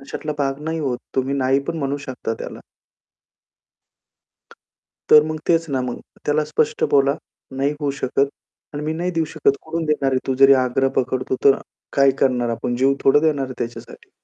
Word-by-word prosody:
अशातला 150 Hz, +2 st, -5 dB
भाग 135 Hz, -1 st, -1 dB
नाही 160 Hz, 0 st, -2 dB
होत, 130 Hz, -5 st, -1 dB, 0.2 s
तुम्ही 135 Hz, +1 st, 0 dB
नाही 135 Hz, 0 st, +2 dB
पण 165 Hz, -, -3 dB
म्हणू 140 Hz, 0 st, -1 dB
शकता 125 Hz, -3 st, -4 dB
त्याला. -, -, -7 dB, 2.5 s
तर 150 Hz, 0 st, +8 dB
मग 155 Hz, -, -5 dB
तेच 165 Hz, -1 st, +3 dB
ना 130 Hz, -2 st, 0 dB
मग. 125 Hz, -1 st, -4 dB, 0.3 s
त्याला 150 Hz, +1 st, +2 dB
स्पष्ट 150 Hz, 0 st, 0 dB
बोला 140 Hz, 0 st, +4 dB, 0.4 s
"नाही 140 Hz, +2 st, +1 dB
होऊ 145 Hz, -2 st, -1 dB
शकत 140 Hz, +2 st, +1 dB, 0.4 s
आणि 145 Hz, -, -4 dB
मी 155 Hz, +1 st, -1 dB
नाही 175 Hz, +3 st, -2 dB
देऊ 165 Hz, -2 st, 0 dB
शकत. 155 Hz, -2 st, +1 dB
कुठून 165 Hz, +1 st, -3 dB
देणार 150 Hz, -3 st, +1 dB
आहे?" 130 Hz, -1 st, -1 dB
तू 130 Hz, -, 0 dB
जरी 135 Hz, 0 st, +9 dB
आग्रह 135 Hz, +2 st, +1 dB
पकडतो, 130 Hz, 0 st, -1 dB
तर 135 Hz, -, +7 dB, 0.4 s
काय 140 Hz, -1 st, +5 dB
करणार? 125 Hz, -3 st, +2 dB
आपण 115 Hz, +1 st, -2 dB
जीव 135 Hz, +2 st, +3 dB
थोडं 145 Hz, +2 st, +5 dB
देणार 145 Hz, -4 st, +1 dB
आहे 130 Hz, -, -7 dB
त्याच्यासाठी. 120 Hz, 0 st, -7 dB
140 Hz, 175 wpm, -21 LUFS, 130-150 Hz, 2.5 s, जरी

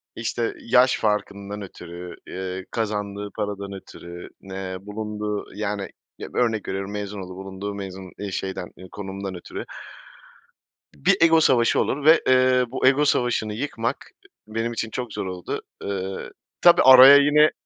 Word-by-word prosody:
İşte, 115 Hz, 0 st, -2 dB
yaş 125 Hz, +2 st, +4 dB
farkından 105 Hz, -1 st, -2 dB
ötürü, 90 Hz, -2 st, -9 dB
eee, 95 Hz, 0 st, -5 dB
kazandığı 105 Hz, -2 st, -3 dB
paradan 100 Hz, -1 st, -4 dB
ötürü, 85 Hz, -2 st, -10 dB
eee, 95 Hz, -1 st, -6 dB
bulunduğu, 105 Hz, 0 st, -4 dB
yani, 105 Hz, -1 st, -3 dB, 0.3 s
ya, -, -, -7 dB
örnek 115 Hz, -4 st, 0 dB
veriyorum, 95 Hz, +1 st, -4 dB
mezun 105 Hz, 0 st, -5 dB
olduğu, 90 Hz, 0 st, -8 dB
bulunduğu, 95 Hz, +1 st, -6 dB
mezun, 95 Hz, -2 st, -7 dB
ııı, 100 Hz, -1 st, -4 dB
şeyden, 95 Hz, -1 st, -4 dB
eee, 95 Hz, -, -11 dB
konumdan 95 Hz, -1 st, -6 dB
ötürü. 85 Hz, -, -7 dB, 1.3 s
Bir 70 Hz, -, +2 dB
ego 165 Hz, -1 st, +6 dB
savaşı 120 Hz, -6 st, +3 dB
olur 140 Hz, +2 st, -1 dB
ve, 160 Hz, +1 st, +7 dB
eee, 130 Hz, 0 st, +4 dB
bu 130 Hz, -, +1 dB
ego 140 Hz, +3 st, +4 dB
savaşını 120 Hz, -6 st, +1 dB
yıkmak 115 Hz, -1 st, -4 dB, 0.4 s
benim 115 Hz, +2 st, -2 dB
için 115 Hz, -1 st, -3 dB
çok 125 Hz, +1 st, -5 dB
zor -, -, -4 dB
oldu, 90 Hz, -2 st, -5 dB, 0.2 s
ııı, 95 Hz, -1 st, -4 dB, 0.3 s
tabii 175 Hz, -1 st, +7 dB
araya 130 Hz, +1 st, +10 dB
yine, 150 Hz, +2 st, +5 dB
105 Hz, 145 wpm, -23 LUFS, 95-120 Hz, 1.3 s, araya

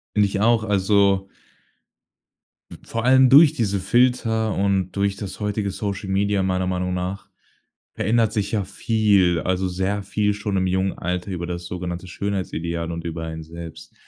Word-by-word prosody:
Finde 105 Hz, -1 st, +4 dB
ich 100 Hz, 0 st, -3 dB
auch. 115 Hz, 0 st, +3 dB
Also 100 Hz, -1 st, +2 dB, 1.4 s
v -, -, -9 dB
vor 115 Hz, +1 st, -2 dB
allem 130 Hz, 0 st, +6 dB
durch 145 Hz, +2 st, +8 dB
diese 100 Hz, -4 st, -1 dB
Filter 110 Hz, 0 st, +1 dB
und 95 Hz, -2 st, 0 dB
durch 100 Hz, 0 st, 0 dB
das 100 Hz, -1 st, -7 dB
heutige 105 Hz, -1 st, -2 dB
Social 100 Hz, 0 st, -4 dB
Media 100 Hz, 0 st, +1 dB
meiner 95 Hz, -1 st, 0 dB
Meinung 90 Hz, 0 st, -1 dB
nach 90 Hz, +2 st, -4 dB, 0.7 s
verändert 115 Hz, +1 st, +1 dB
sich 105 Hz, -2 st, -1 dB
ja 105 Hz, -3 st, -1 dB
viel, 100 Hz, -3 st, +2 dB
also, 95 Hz, 0 st, -1 dB
sehr 95 Hz, +3 st, -2 dB
viel 105 Hz, +1 st, 0 dB
schon 105 Hz, -1 st, -3 dB
im 95 Hz, 0 st, +1 dB
jungen 95 Hz, +1 st, 0 dB
Alter 90 Hz, +2 st, -4 dB
über 85 Hz, -1 st, -4 dB
das 85 Hz, 0 st, -5 dB
sogenannte 90 Hz, +1 st, -5 dB
Schönheitsideal 85 Hz, -3 st, -3 dB
und 85 Hz, 0 st, -6 dB
über 80 Hz, 0 st, -4 dB
einen 80 Hz, 0 st, -6 dB
selbst. 85 Hz, 0 st, -10 dB
95 Hz, 160 wpm, -22 LUFS, 90-105 Hz, 1.4 s, durch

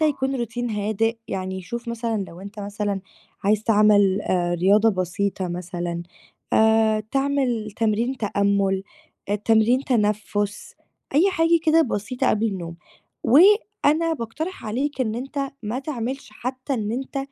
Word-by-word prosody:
ده 310 Hz, -, +4 dB
يكون 270 Hz, -3 st, -1 dB
routine 240 Hz, +1 st, -4 dB
هادئ، 220 Hz, +2 st, 0 dB
يعني 190 Hz, 0 st, -4 dB
شوف 235 Hz, +4 st, -6 dB
مثلًا 230 Hz, -3 st, -2 dB
لو 170 Hz, -, -12 dB
أنت 200 Hz, +2 st, -9 dB
مثلًا 205 Hz, -1 st, -3 dB, 0.4 s
عايز 210 Hz, +1 st, +2 dB
تعمل 205 Hz, -3 st, +4 dB
آآ، 175 Hz, -1 st, 0 dB
رياضة 200 Hz, +5 st, +4 dB
بسيطة 185 Hz, 0 st, -2 dB
مثلًا 175 Hz, -1 st, -4 dB, 0.5 s
آآ، 220 Hz, 0 st, +4 dB
تعمل 270 Hz, -5 st, 0 dB
تمرين 230 Hz, +4 st, 0 dB
تأمُّل، 200 Hz, -2 st, +1 dB, 0.5 s
آآ، 205 Hz, -, +1 dB
تمرين 225 Hz, +5 st, +3 dB
تنفُّس، 210 Hz, -3 st, -1 dB, 0.4 s
أي 360 Hz, +7 st, +5 dB
حاجة 335 Hz, -1 st, +3 dB
كده 325 Hz, 0 st, +5 dB
بسيطة 250 Hz, +1 st, -1 dB
قبل 215 Hz, +1 st, +1 dB
النوم، 175 Hz, -5 st, -5 dB, 0.5 s
وأنا 335 Hz, -, +4 dB
باقترح 290 Hz, +5 st, -5 dB
عليك 270 Hz, +6 st, -2 dB
إن 220 Hz, -4 st, 0 dB
أنت 275 Hz, +3 st, -3 dB
ما 220 Hz, +4 st, -3 dB
تعملش 265 Hz, -3 st, -4 dB
حتى 260 Hz, +4 st, -4 dB
إن 215 Hz, -2 st, -2 dB
أنت 270 Hz, +2 st, -4 dB
220 Hz, 135 wpm, -23 LUFS, 200-265 Hz, 0.5 s, أي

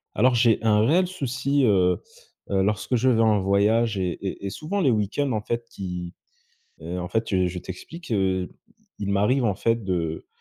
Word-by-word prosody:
Alors, 125 Hz, +5 st, +4 dB
j'ai 115 Hz, -2 st, +3 dB
un 105 Hz, -2 st, +4 dB
réel 175 Hz, +8 st, +3 dB
souci, 140 Hz, -4 st, -1 dB
heu 90 Hz, -4 st, +3 dB, 0.5 s
heu 95 Hz, -1 st, +2 dB
lorsque 105 Hz, +4 st, 0 dB
je 130 Hz, +2 st, +3 dB
vais 115 Hz, -2 st, +3 dB
en 110 Hz, -2 st, +4 dB
voyage 105 Hz, +3 st, +2 dB
et 90 Hz, -1 st, 0 dB, 0.2 s
et 95 Hz, -, -4 dB
et -, -, -2 dB
souvent 180 Hz, -, -3 dB
les 140 Hz, -, +3 dB
week-ends 115 Hz, +5 st, 0 dB
en 110 Hz, -, -1 dB
fait 120 Hz, +2 st, -3 dB
qui, 90 Hz, -4 st, -6 dB, 0.7 s
heu, 85 Hz, +3 st, -4 dB
en 90 Hz, -, -4 dB
fait, 110 Hz, +3 st, -2 dB
heu, 95 Hz, -1 st, +3 dB
je 90 Hz, +1 st, -4 dB
t'explique, 125 Hz, -, -9 dB
heu, 95 Hz, -3 st, 0 dB, 0.5 s
il 100 Hz, -1 st, -3 dB
m'arrive, 105 Hz, +7 st, +2 dB
en 105 Hz, -4 st, +2 dB
fait 115 Hz, +3 st, 0 dB
de 85 Hz, -4 st, -2 dB
105 Hz, 190 wpm, -24 LUFS, 95-120 Hz, 0.7 s, Alors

